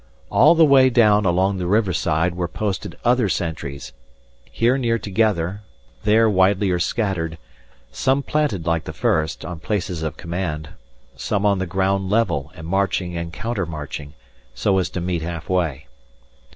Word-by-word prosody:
All - - +6
the 165 -1 +6
way 135 -3 +6
down 105 -4 +4
along 95 +2 +2
the 90 -1 -3
river 100 -1 +2
side 80 +2 0
were 90 -1 -2
posted 100 +1 -4
other 120 -3 +3
sentries; 70 -5 -4 0.6
here 120 +3 +2
near 120 -4 +1
together, 100 -3 0 0.4
there 110 +2 +5
widelier 95 -2 +2
scattered; 90 -5 -1 0.5
some 135 +2 +1
planted 140 - -1
like 85 -1 0
the - - -6
first, 80 -1 0
on 85 -2 -6
places 90 -2 -3
of 80 -1 -4
command, 85 -4 -4 0.5
some 105 -1 -1
on 100 -2 +3
the 95 - -2
ground 95 +1 0
level 85 -10 0
and 80 -3 -9
marching 95 -1 -1
and 85 0 -4
counter 105 0 -3
marching, 75 -2 -7 0.4
so 95 +6 +2
as 90 - -1
to 90 - -4
meet 90 -1 -2
half 85 -1 -5
way. 80 -6 -1
95 Hz, 155 wpm, -21 LUFS, 85-105 Hz, 0.6 s, All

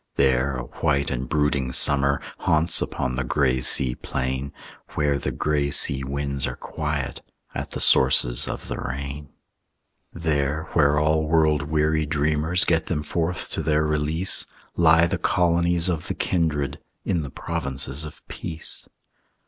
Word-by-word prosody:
There 65 0 +2
a 65 - -4
white 70 +3 -1
and - - -4
brooding 75 -4 0
summer 70 +2 +4 0.2
Haunts 80 +1 +3
upon 65 - -2
the 65 +2 -2
gray 65 -1 +1
sea 60 0 +4
plain, 65 +2 -4 0.4
Where 75 -2 +1
the - - -3
gray 75 -1 0
sea 65 -1 +2
winds 70 0 -2
are - - -5
quiet 75 -4 -4 0.3
At - - -5
the - - -6
sources - - +5
of - - -6
the - - -5
rain. 70 +2 -6 0.8
There 75 -2 -1
where 75 -2 +3
all 80 +1 +1
world 80 -1 +3
weary 80 0 +1
dreamers 75 +3 +1
Get 80 -2 +1
them 75 -3 -2
forth 85 +3 -2
to - - -2
their 75 0 +1
release, 75 +4 0 0.3
Lie 80 0 +5
the 85 - -2
colonies 85 0 +2
of 85 -4 -2
the - - -3
kindred, 80 -6 -1 0.3
In 85 -4 0
the 70 - -6
provinces 65 +2 -3
of 75 - -11
peace. 80 -1 -6
75 Hz, 150 wpm, -23 LUFS, 70-80 Hz, 0.8 s, sources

